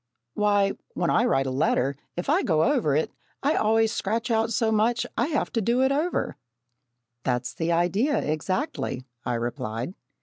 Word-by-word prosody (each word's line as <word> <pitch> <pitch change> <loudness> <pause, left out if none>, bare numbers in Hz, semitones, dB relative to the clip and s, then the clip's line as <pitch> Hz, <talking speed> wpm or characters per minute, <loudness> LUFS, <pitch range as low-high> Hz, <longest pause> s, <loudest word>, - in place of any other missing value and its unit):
"Why, 205 -1 +3 0.2
when 175 - +1
I 235 - +3
write 135 - +2
a 130 - -2
letter, 135 0 +1 0.2
if 175 - -3
I - - +3
go 160 -3 +2
over 235 - +2
it 155 - 0 0.3
I 290 +3 +3
always 225 +1 +3
scratch 225 +5 -1
out 225 0 +2
so 220 0 +1
much 230 +2 +2
that - - -9
I - - +1
have 300 -3 -1
to 230 - 0
do 240 +5 +2
it 265 - +3
over." 310 +6 -1 0.8
"That's 125 0 -1
the 165 +1 -1
idea, 185 - +2
exactly," 155 - -2 0.2
I 120 - 0
replied. 115 +4 -3
205 Hz, 175 wpm, -26 LUFS, 150-235 Hz, 0.8 s, Why